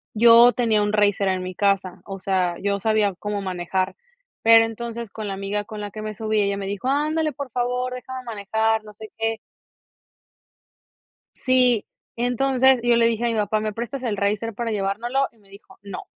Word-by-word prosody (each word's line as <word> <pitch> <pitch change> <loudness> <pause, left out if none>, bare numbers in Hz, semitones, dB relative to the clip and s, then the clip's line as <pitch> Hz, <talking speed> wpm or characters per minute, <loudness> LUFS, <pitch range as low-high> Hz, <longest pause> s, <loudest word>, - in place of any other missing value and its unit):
Yo 235 +2 +7
tenía 225 -4 +2
un 205 0 0
racer 205 -2 +2
en 185 -1 0
mi 185 0 -5
casa, 195 -2 0
o 195 -1 -6
sea, 185 -2 0
yo 200 0 0
sabía 215 -1 +1
cómo 205 -1 -3
manejar, 185 0 -2 0.5
pero 225 0 +7
entonces 230 -1 -6
con 215 0 -6
la 195 - -3
amiga 200 +1 -3
con 215 0 -8
la 205 0 -6
que 215 - -7
me 215 0 -5
subí, 215 0 0
ella 200 0 0
me 200 - -4
dijo: 200 +4 -4
"Ándale, 305 +3 +1
por 280 -1 -7
favor, 250 +1 -1
déjame 255 +1 -7
manejar", 220 0 0
no 210 - -12
sé 215 +1 -11
qué. 225 0 -1 2.0
Sí. 250 -4 +2 0.3
Entonces, 255 +2 +3
yo 240 -1 +4
le 230 0 +4
dije 230 0 -1
a - - +2
mi - - -1
papá: 215 0 0
"¿Me 215 0 -3
prestas 240 +4 -5
el 220 -5 -2
racer 210 +3 -1
para 230 +2 -3
llevárnoslo?". 220 +7 -1
Y 230 - -29
me 200 -2 -25
dijo: 195 -1 -16
"No. 200 -2 -7
215 Hz, 195 wpm, -23 LUFS, 200-240 Hz, 2.0 s, Yo